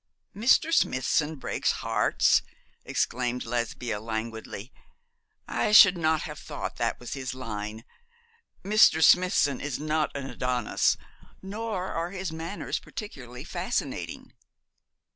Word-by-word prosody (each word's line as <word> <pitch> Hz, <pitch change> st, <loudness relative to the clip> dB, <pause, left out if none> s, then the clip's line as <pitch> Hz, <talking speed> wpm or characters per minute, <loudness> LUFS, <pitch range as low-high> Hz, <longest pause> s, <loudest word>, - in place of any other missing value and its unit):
'Mr. 260 Hz, +9 st, +3 dB
Smithson 150 Hz, -, +2 dB
breaks 135 Hz, -, -2 dB
hearts!' -, -, +2 dB, 0.4 s
exclaimed 125 Hz, 0 st, -1 dB
Lesbia, 120 Hz, -1 st, -2 dB
languidly. 110 Hz, +1 st, -5 dB, 0.7 s
'I 210 Hz, -, 0 dB
should 200 Hz, -3 st, +9 dB
not 160 Hz, -2 st, +1 dB
have -, -, -7 dB
thought -, -, -6 dB
that -, -, -1 dB
was 120 Hz, -, -6 dB
in -, -, -6 dB
his 130 Hz, -1 st, -4 dB
line. 110 Hz, -3 st, -5 dB, 0.8 s
Mr. 200 Hz, -5 st, +5 dB
Smithson 180 Hz, -6 st, +4 dB
is 145 Hz, -3 st, -3 dB
not 155 Hz, +1 st, 0 dB
an 140 Hz, -1 st, -4 dB
Adonis, 125 Hz, -3 st, 0 dB, 0.5 s
nor 200 Hz, -1 st, -4 dB
are 165 Hz, +1 st, -2 dB
his 185 Hz, -2 st, -4 dB
manners 165 Hz, +5 st, -4 dB
particularly 125 Hz, -, -8 dB
fascinating.' -, -, -4 dB
145 Hz, 115 wpm, -27 LUFS, 120-180 Hz, 0.8 s, should